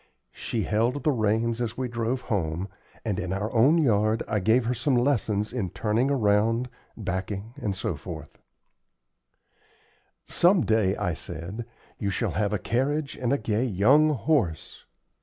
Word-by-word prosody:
She 110 -3 -3
held 120 +7 0
the 155 - +3
reins 115 0 0
as 115 -2 -3
we 130 -1 -1
drove 120 +2 -2
home, 90 -3 -2 0.4
and, 105 -4 -1
in 90 0 -3
our 100 +3 -2
own 130 +8 +5
yard, 110 -6 +2
I 105 - 0
gave 110 +5 +3
her 120 - +1
some 125 +3 0
lessons 115 -5 +1
in 105 -8 -2
turning 115 +7 0
around, 115 -1 +2 0.3
backing, 100 +2 -4
etc. 95 -3 -4 2.0
"Some 175 0 +3
day," 110 -3 +2
I 90 - -1
said, 85 +9 -6 0.3
"you 100 - -1
shall 95 - -1
have 105 -1 0
a 105 - +1
carriage 140 +7 -1
and 125 -1 -1
a 140 - +3
gay 110 0 -1
young 130 +9 +4
horse." 125 - -1
110 Hz, 145 wpm, -26 LUFS, 100-125 Hz, 2.0 s, own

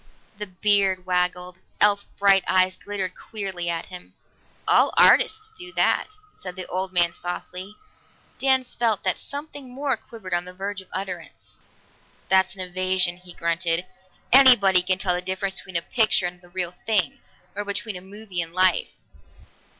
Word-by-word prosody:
The 210 - -5
beard 190 -1 +1
waggled; 180 0 -1 0.2
elf 205 -1 +3
bright 195 -1 +5
eyes 185 0 +3
glittered 195 -2 -5
queerly 190 -5 -4
at 165 -1 -2
him. 180 -1 -12 0.5
"All - - +4
artists 435 0 +4
do 355 -3 -8
that," - - +2 0.3
said 180 -1 -9
the 185 - -5
old 185 +1 -3
man 175 -2 +3
softly. 180 +3 -7 0.6
Dan 265 -1 +3
felt 235 -4 -1
that 185 - 0
something 285 -2 -8
more 270 +2 -1
quivered 205 -6 -9
on 175 0 0
the 180 0 -10
verge 195 +1 -5
of 185 - -19
utterance. 185 -2 -7 0.7
"That's 190 0 +3
an 190 - -7
evasion," 185 -1 0
he 180 0 -15
grunted. 170 +1 -1 0.5
"Anybody 240 -9 +7
can 185 +1 0
tell 185 -1 0
the 180 - -2
difference 190 +1 -3
between 185 -3 -2
a 170 - -2
picture 220 -4 +2
and 175 0 -6
the 175 - -19
real 180 -1 -3
thing, 225 +5 +1 0.4
or 205 - -2
between 205 +1 -3
a 180 - -7
movie 195 -1 -4
and 165 0 -6
life." 185 -1 +2
185 Hz, 160 wpm, -24 LUFS, 180-205 Hz, 0.7 s, Anybody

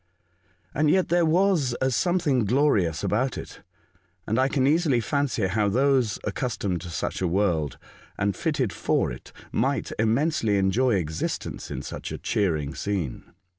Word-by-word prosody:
And 150 +1 +2
yet 185 +3 +2
there 175 -1 +3
was 165 -7 +2
a 130 0 +1
something 160 -4 +1
glorious 105 - +2
about 125 +5 0
it; - - -9 0.6
and 110 +4 0
I 130 - +4
can 135 -1 +1
easily 150 -3 +3
fancy 125 -2 0
how 100 +2 +1
those 130 -1 +2
accustomed 100 -5 -2
to 90 - -7
such 85 - -3
a 90 - +1
world, 85 -7 0 0.4
and 100 -2 0
fitted 135 - -1
for - - 0
it, - - -10
" - - -21
might - - 0
immensely 115 -1 +2
enjoy 105 +5 +2
existence 80 -4 -3
in - - -5
such - - -6
a - - -4
cheering 80 -8 -1
scene. 95 -10 -3
115 Hz, 155 wpm, -25 LUFS, 95-140 Hz, 0.6 s, I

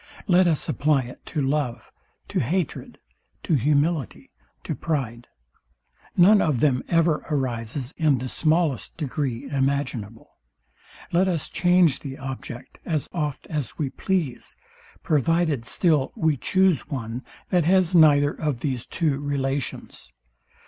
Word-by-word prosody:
Let 185 -1 +4
us 160 -4 0
apply 145 -2 +2
it 125 +1 -11
to 150 -3 -2
love, 135 -5 -2 0.4
to - - 0
hatred, 170 +5 -2 0.5
to - - 0
humility, 145 - 0 0.3
to - - -3
pride; 125 -7 -3 0.9
none 200 +3 +7
of 145 -7 +1
them 130 -2 +2
ever 165 -2 +2
arises 130 -1 -2
in 150 -4 +3
the 130 +2 -4
smallest 155 0 0
degree 140 -5 -3
imaginable. 135 -6 -2 0.8
Let 180 +3 +3
us 170 -5 -1
change 175 -3 +3
the 135 -2 -7
object, 130 -2 -8
as 155 -4 -2
oft 150 -5 -3
as 150 -7 -3
we 140 -4 -2
please; 170 -10 -2 0.5
provided 155 -3 +1
still 155 -5 +2
we 160 -2 +2
choose 185 +2 +2
one, 120 -2 -4 0.3
that 175 -4 +3
has 185 0 +3
neither 145 -4 +6
of 145 -6 -3
these 130 -5 -3
two 150 -5 0
relations. 140 - -3
145 Hz, 130 wpm, -24 LUFS, 130-165 Hz, 0.9 s, none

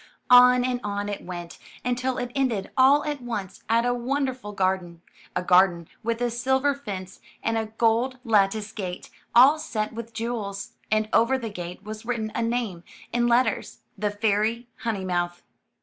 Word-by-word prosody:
On 250 0 +8
and 250 -1 -1
on 205 0 -2
it 205 - -5
went, 175 -1 -7 0.3
until 250 +1 0
it 245 -1 -3
ended 245 -8 -1
all 275 +3 +5
at 295 -3 -3
once 215 -6 -5
at 230 +1 +3
a 245 - +2
wonderful 255 -2 -2
garden 185 -3 -1 0.2
— - - -25
a 180 - 0
garden 180 -2 +4
with 230 +1 -2
a 240 -1 +1
silver 265 +4 +1
fence 195 -9 -7 0.2
and 225 - 0
a 220 -1 -1
gold 230 +4 +1
lattice 215 -2 +2
gate 185 -5 -6 0.2
all 270 +6 +7
set 225 -9 -3
with 230 0 -7
jewels, 225 -3 -4 0.2
and 215 0 +2
over 245 +4 +4
the 230 -4 -5
gate 180 0 -7
was 215 +1 -7
written 225 -2 -2
a - - -1
name 230 -7 -2 0.3
in 240 0 +2
let 240 +2 +5
ters, - - -4
*The 210 0 -1
Fairy 215 +3 0
Honeymouth. 180 -5 -2
225 Hz, 170 wpm, -25 LUFS, 200-245 Hz, 0.3 s, On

